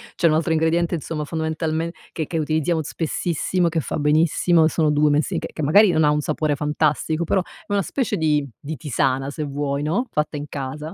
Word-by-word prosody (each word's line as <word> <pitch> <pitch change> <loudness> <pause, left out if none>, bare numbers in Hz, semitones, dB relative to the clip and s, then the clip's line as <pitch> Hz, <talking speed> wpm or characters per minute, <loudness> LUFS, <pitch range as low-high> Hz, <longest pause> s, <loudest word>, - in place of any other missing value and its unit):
c'è 170 - +3
un 155 - +3
altro 165 +1 +1
ingrediente 165 +2 +1
insomma 150 -1 -4
fondamentalmen 160 +1 -2 0.2
che 160 -3 -4
che 165 - -3
utilizziamo 160 +2 0
spessissimo, 170 +3 -1
che 165 0 -1
fa - - -4
benissimo, 155 +2 +3
sono 155 -2 +1
2 150 0 +3
mesi 145 +1 +1
che - - -6
che 155 - -4
magari 195 +7 +6
non 160 - +2
ha 150 - +4
un 150 - +1
sapore 150 0 -1
fantastico, 150 +2 0
però 190 - +2
è 180 - -14
una 200 - +2
specie 260 +6 -2
di 150 -3 +1
di 155 +2 -6
tisana, 135 0 0
se 155 - -6
vuoi, 140 0 -2
no? 190 +12 0
Fatta 150 0 -1
in 145 - -5
casa 150 +4 -5
155 Hz, 205 wpm, -22 LUFS, 150-165 Hz, 0.2 s, magari